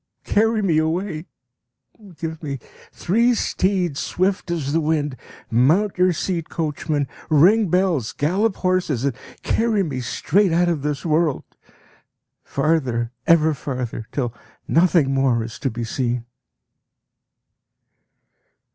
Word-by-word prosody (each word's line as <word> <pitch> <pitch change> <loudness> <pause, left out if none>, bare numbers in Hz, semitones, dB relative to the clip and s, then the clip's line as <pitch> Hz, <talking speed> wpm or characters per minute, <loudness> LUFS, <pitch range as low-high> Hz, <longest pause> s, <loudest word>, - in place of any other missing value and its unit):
Carry 220 +1 +2
me 165 -5 +3
away! 160 +1 -2 0.9
Give 160 -1 -5
me 140 -3 -4 0.3
three 235 +7 +2
steeds 185 -8 0
swift 185 0 -1
as 150 -5 -2
the 165 - +2
wind! 150 -3 0 0.4
Mount 155 - +3
your 185 0 +5
seat, 170 -1 -2
coachman, 150 -2 -2 0.2
ring 190 +8 +5
bells, 175 - +1
gallop 190 +8 0
horses, 180 -9 0
and 140 - +1 0.3
carry 225 -3 +1
me 140 -7 -3
straight 170 +10 +1
out 175 +1 +3
of 165 -4 -1
this 150 +1 -3
world. 155 -2 +1 1.0
Farther, 130 -6 0 0.2
ever 160 -1 +5
farther, 125 -6 -5
till 120 -5 -2 0.3
nothing 165 -5 +3
more 130 -4 +2
is 115 0 -8
to 135 - -1
be 120 0 -5
seen! 120 0 -2
160 Hz, 120 wpm, -22 LUFS, 135-185 Hz, 1.0 s, your